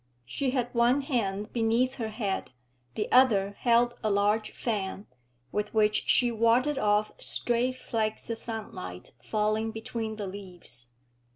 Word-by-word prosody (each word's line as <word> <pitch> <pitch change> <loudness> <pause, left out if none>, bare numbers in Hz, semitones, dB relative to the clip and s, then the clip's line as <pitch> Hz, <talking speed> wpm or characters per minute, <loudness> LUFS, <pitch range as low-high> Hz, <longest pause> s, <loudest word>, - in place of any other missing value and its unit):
She 270 - -1
had 250 -2 -1
one 240 +3 +3
hand 210 -7 -2
beneath 235 +3 +1
her 225 -3 -3
head, 205 - -3 0.4
the 210 - -1
other 210 -7 +5
held 240 -1 +3
a 215 - +2
large 210 +2 +2
fan, 200 -3 -3 0.5
with 210 +1 -2
which 215 -1 +3
she 245 -1 +4
warded 235 +5 +2
off 210 -1 +2
stray 240 +1 0
flakes 225 -3 -3
of 225 - -4
sunlight 195 - -7
falling 215 - 0
between 225 0 -4
the 210 -1 -4
leaves. 180 -11 -9
220 Hz, 135 wpm, -28 LUFS, 205-240 Hz, 0.5 s, other